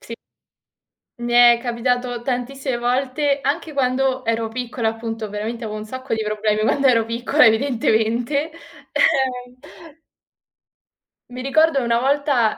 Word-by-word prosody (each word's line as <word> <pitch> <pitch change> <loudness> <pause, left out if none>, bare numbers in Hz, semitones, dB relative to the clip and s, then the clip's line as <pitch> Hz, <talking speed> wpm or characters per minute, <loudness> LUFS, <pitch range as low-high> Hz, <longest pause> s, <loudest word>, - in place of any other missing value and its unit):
Sì. 230 - -8 1.1
Mi 240 0 -3
è 240 -1 +7
capitato 245 0 -2
tantissime 255 +1 -3
volte, 265 +4 0
anche 295 +3 -2
quando 260 -1 0
ero 225 -1 -1
piccola 235 -1 -2
appunto, 225 -1 -5
veramente 220 +3 -5
avevo 215 -1 -5
un 210 - -7
sacco 260 +2 -5
di 220 - -1
problemi 215 0 -1
quando 275 +6 +1
ero 230 -4 +4
piccola 240 +6 +2
evidentemente. 235 +4 0 0.4
Eh. 250 -2 0 1.7
Mi 250 +1 -7
ricordo 280 +2 +2
una 235 0 +1
volta, 270 -3 +1
245 Hz, 125 wpm, -20 LUFS, 225-270 Hz, 1.7 s, è